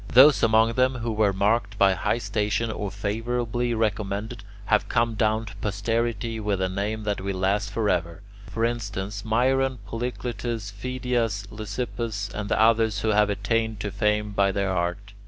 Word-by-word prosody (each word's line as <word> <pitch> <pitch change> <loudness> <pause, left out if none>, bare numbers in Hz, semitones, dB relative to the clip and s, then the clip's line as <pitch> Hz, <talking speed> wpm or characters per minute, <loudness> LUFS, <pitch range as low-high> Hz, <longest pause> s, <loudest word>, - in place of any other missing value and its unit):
Those 135 +4 +7
among 110 +1 +4
them 130 +1 +2
who 120 -1 -3
were 105 -2 +2
marked 105 +2 +1
by 100 -2 +5
high 95 - 0
station 110 -1 -1
or 105 -2 -3
favourably 115 +4 -2
recommended 110 0 -2 0.2
have 105 -1 +2
come 115 -1 +2
down 110 0 +1
to 105 0 -10
posterity 115 +2 -1
with 105 -3 -1
a 95 - +1
name 105 +3 -2
that 105 -2 -2
will 95 0 -3
last 100 +2 +1
forever; 90 -4 -1 0.2
for 115 0 -1
instance, 105 -3 -3
Myron, 130 +3 +2
Polycletus, 115 -2 -4
Phidias, 115 -2 -2
Lysippus, 105 -1 -4
and 105 -1 -4
the - - +1
others 110 -2 +3
who 110 - 0
have 105 0 +4
attained 110 +2 -1
to 105 - -3
fame 105 0 0
by 100 -1 +2
their 100 0 -1
art. 90 +3 -2
105 Hz, 160 wpm, -25 LUFS, 100-115 Hz, 0.2 s, Those